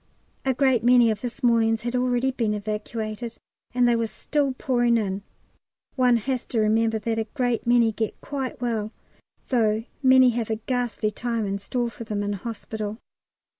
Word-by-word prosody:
A 265 -1 +2
great 260 -4 +3
many 240 -1 +6
of 210 -1 -4
this 245 +2 -6
morning's 225 -2 +3
had 240 +1 -2
already 250 +1 +1
been 230 -5 -1
evacuated, 215 +2 -4 0.3
and 245 -1 +3
they 240 - +4
were 230 -1 0
still 285 +4 -1
pouring 240 -3 +2
in. 200 -2 -2 0.7
One 250 -2 +4
has 255 +2 -2
to 230 - -2
remember 220 +1 +2
that 225 +1 -2
a 220 - -1
great 245 -4 0
many 235 -2 +4
get 220 0 -3
quite 270 -3 -4
well, 225 -3 -2 0.6
though 220 -3 +2 0.2
many 260 -2 +6
have 230 -2 -2
a 220 - +1
ghastly 235 -1 -2
time 230 -1 -2
in 200 0 -2
store 240 +4 -2
for 230 - -8
them 210 -2 -3
in 205 0 -1
hospital. 215 0 -5
230 Hz, 170 wpm, -25 LUFS, 220-245 Hz, 0.7 s, many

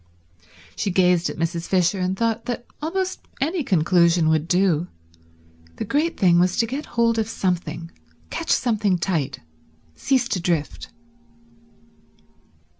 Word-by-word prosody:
She - - -1
gazed 180 -2 +3
at - - -7
Mrs. 165 +1 -2
Fisher, 185 0 +2
and 185 +1 -1
thought 230 0 -1
that 240 0 -4 0.2
almost 370 +4 -2 0.2
any 315 +4 0
conclusion 170 -4 +3
would 160 0 +1
do; 180 -2 +2 0.9
the - - -4
great 310 +4 0
thing 175 -2 +5
was 180 +1 +2
to 230 - +3
get 270 +6 -5
hold 230 -1 +3
of 220 0 -1
something, 170 -4 -2 0.4
catch - - -4
something 210 -6 +2
tight, 170 -6 -2 0.5
cease 255 - +1
to 190 - 0
drift. 145 - -2
185 Hz, 130 wpm, -23 LUFS, 170-230 Hz, 0.9 s, thing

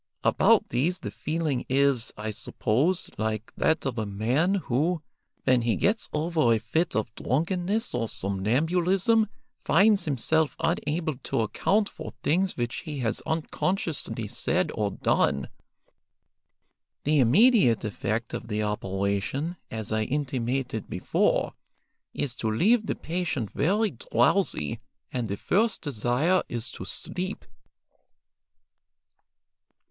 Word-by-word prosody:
About - - +4
these 150 +10 +1
the - - -6
feeling 155 -5 -2
is, 135 -2 +2
I 110 +1 -3
suppose, 135 - 0
like 110 0 -2
that 160 - +1
of 125 -4 -2
a 110 - -1
man 125 - +1
who, 160 0 0 0.4
when 130 -2 +4
he 115 -1 +1
gets 215 +3 +1
over 155 -5 +1
a 115 - +5
fit 145 +11 -1
of 110 0 -1
drunkenness 180 - -1
or 120 -2 -1
somnambulism, 170 - +1 0.4
finds 205 0 +4
himself 155 +2 +1
unable 155 -3 -1
to 120 - -1
account 200 - +1
for - - -8
things 185 +5 +1
which 120 -1 -2
he 155 -4 -6
has 110 -2 -1
unconsciously 160 - -1
said - - 0
or 105 -1 0
done. 70 -7 +1 1.5
The 150 0 +3
immediate 170 - +5
effect 110 +2 -2
of - - -5
the 105 -1 -1
operation, 100 - -1
as 110 -2 -5
I 110 0 +1
intimated 130 -3 -2
before, - - +1 0.6
is 135 -4 -2
to 110 - -1
leave 210 - +3
the - - -1
patient 160 - -3
very 205 +6 +1
drowsy, 120 - +1 0.3
and 125 -3 -1
the 100 0 -3
first 215 - +1
desire 145 - +1
is 120 +1 -3
to 95 - -8
sleep." 185 - -4
135 Hz, 120 wpm, -27 LUFS, 110-175 Hz, 1.5 s, a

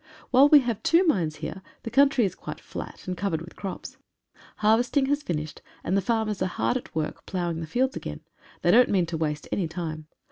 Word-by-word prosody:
While 270 +3 +7
we 295 -2 +8
have 235 -4 -2
two 340 +3 +4
mines 170 - +1
here, 190 - -6 0.2
the 230 - -5
country 275 -3 +4
is 185 - -2
quite - - -8
flat - - -8
and 180 - -2
covered 185 -4 -1
with 170 +2 -11
crops. 195 -2 -7 0.6
Harvesting 235 +6 +3
has 285 +2 0
finished, 155 - -4 0.2
and 185 - 0
the 195 - +3
farmers 215 0 -1
are 185 - +2
hard 185 - -1
at 255 - -5
work 155 -1 -3
ploughing 175 -3 -2
the 165 - -5
fields 260 - 0
again. 75 -1 -6 0.4
They 175 - +5
don't 245 +4 +6
mean 185 -4 +2
to 165 0 -4
waste 150 -1 -2
any 185 -4 0
time. 160 -2 -5
190 Hz, 210 wpm, -26 LUFS, 165-245 Hz, 0.6 s, we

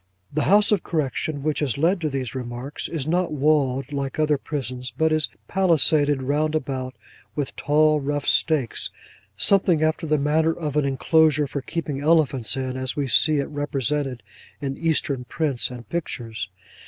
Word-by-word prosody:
The 150 0 0
House 205 +2 +5
of 210 - +3
Correction 150 -1 -2
which 155 0 0
has 135 -7 -1
led 170 +5 +2
to 155 - 0
these 130 -4 -4
remarks, 125 +2 -5
is 155 -5 -3
not 175 +2 0
walled, 140 -2 +1
like 140 -1 -3
other 150 -2 +2
prisons, 130 -4 -4
but 160 +7 0
is 155 -1 +1 0.2
palisaded 155 -6 +3
round 150 +3 0
about 130 -3 -3 0.4
with 145 -2 -3
tall 155 +1 +3
rough 145 0 -2
stakes, 150 -8 +1 0.5
something 180 - +4
after 160 +1 0
the 155 0 +2
manner 155 +3 +2
of 150 -4 -4
an 150 -2 +2
enclosure 150 +2 +3
for 140 0 -4
keeping 145 -1 -4
elephants 140 -7 +2
in, 130 -1 -3
as 130 -1 -2
we 145 -2 -1
see 155 +4 +4
it 140 - -1
represented 145 -3 -2 0.4
in 135 -1 -3
Eastern 150 -5 0
prints 145 -3 0
and 125 -2 -9
pictures. 115 - -4
145 Hz, 165 wpm, -23 LUFS, 135-155 Hz, 0.5 s, House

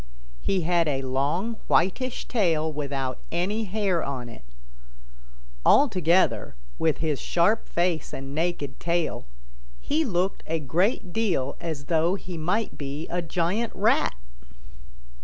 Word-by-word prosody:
He 190 -2 +1
had 170 0 +2
a 135 -2 0
long 145 - 0
whitish 245 +8 +1
tail 160 -9 +1
without 135 -3 -3
any 205 +6 0
hair 195 -4 0
on 125 -3 -4
it. 115 - -12 1.2
Altogether, 185 - +4 0.2
with 160 -2 +2
his 155 -3 -1
sharp 210 +6 +2
face 170 -2 0
and 135 +1 -6
naked 155 -4 -2
tail, 170 - -1 0.5
he 310 +3 +1
looked 190 - 0
a 165 0 0
great 175 - 0
deal 185 -12 0
as 160 -5 -4
though 165 +3 +2
he 185 -2 -7
might 180 +8 -1
be 145 +2 -4
a 175 +1 -1
giant 180 +7 -1
Rat. 205 - +2
170 Hz, 125 wpm, -26 LUFS, 150-195 Hz, 1.2 s, Altogether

